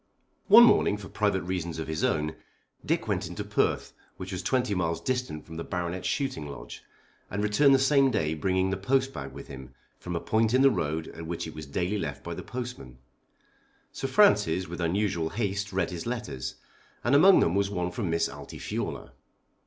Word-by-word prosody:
One 225 +4 +10
morning, 165 - +4
for 100 -2 -10
private 100 -3 0
reasons 90 -3 -3
of 80 - -4
his 80 0 -3
own, 75 0 0 0.5
Dick - - -1
went - - -1
into - - -5
Perth, - - 0 0.2
which 95 +1 -7
was 95 -1 -3
twenty 125 +3 0
miles 85 -3 -1
distant 125 -12 -3
from 80 0 -9
the 85 - -4
Baronet's 90 0 -3
shooting 130 - -2
lodge, 70 - -9 0.5
and 100 +1 -2
returned 135 +7 +5
the - - +5
same 135 0 +4
day 80 -10 0
bringing 95 +3 0
the 95 - -1
postbag 130 - -1
with 70 +1 -10
him 65 -1 -10 0.2
from 90 -1 -5
a - - 0
point 110 +4 +1
in 130 - +4
the 135 - +7
road 80 -5 -2
at 85 0 -9
which 85 0 -3
it 80 - -7
was 75 -2 -8
daily 90 +8 -1
left - - -5
by - - -5
the - - -6
postman. 120 - -7 0.9
Sir - - -4
Francis 90 +3 +4
with 85 +1 -6
unusual 85 -2 0
haste 100 -1 -2
read 95 -2 -1
his 85 +4 -5
letters, 105 - -4 0.5
and 120 - +1
among 185 +7 +7
them 85 - +2
was 100 0 +1
one 90 -3 -2
from 95 0 -3
Miss 85 0 +1
Altifiorla. - - -6
95 Hz, 190 wpm, -28 LUFS, 80-115 Hz, 0.9 s, One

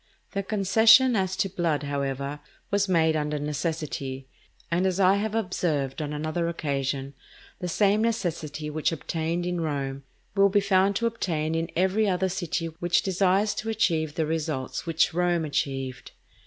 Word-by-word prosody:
The 200 - -1
concession 220 +5 +5
as 190 -2 0
to 195 +1 +1
blood, 170 -5 -1
however, 140 0 -3 0.3
was 200 -1 +1
made 160 -3 +3
under 150 -1 -1
necessity, 145 -3 -3 0.4
and 180 +3 +2
as 185 0 -1
I 195 +1 +5
have 215 +1 -2
observed 160 -9 -1
on 150 -1 -3
another 155 +3 -2
occasion, 140 -4 -2 0.5
the 180 - -3
same 205 +4 +2
necessity 165 -9 -2
which 155 +2 0
obtained 165 +2 -2
in 180 -1 -1
Rome, 140 -3 -3 0.3
will 200 0 +5
be 205 +1 +3
found 195 0 +3
to 235 - 0
obtain 165 -9 -1
in 165 0 -1
every 190 +4 +2
other 190 0 +1
city 175 -2 -2
which 175 -1 +2
desires 195 +2 +2
to 225 - -4
achieve 165 -9 0
the 160 - 0
results 155 -2 -3
which 160 -1 +2
Rome 175 -1 +1
achieved. 135 -3 -3
170 Hz, 155 wpm, -26 LUFS, 150-195 Hz, 0.5 s, concession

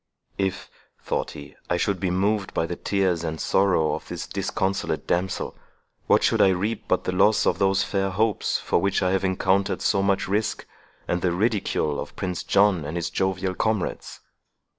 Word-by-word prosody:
If, 95 -1 -1 0.4
thought - - -2
he, 70 -1 -11
I 85 - +2
should 100 +1 0
be 95 - 0
moved 100 +2 0
by 80 - +1
the 90 - -4
tears 95 -4 0
and 80 -1 -3
sorrow 95 -5 +2
of - - -5
this - - -5
disconsolate 95 +1 -2
damsel, 90 +1 -1 0.5
what - - +4
should - - +3
I 95 - +6
reap 100 +4 -1
but 95 - +1
the - - -1
loss 105 +4 +3
of - - +1
these 95 0 +3
fair 95 -1 -1
hopes 105 +2 0
for - - 0
which 100 0 +1
I 90 - +2
have 95 0 +1
encountered 95 +1 +1
so 100 - +2
much 100 0 +1
risk, 105 +2 -1 0.4
and 90 - 0
the 90 -2 +1
ridicule 100 -7 0
of - - -7
Prince 90 -2 -3
John 100 -4 +3
and 75 +4 -4
his 85 - -2
jovial 95 0 -1
comrades? 110 0 -2
95 Hz, 185 wpm, -24 LUFS, 90-100 Hz, 0.5 s, I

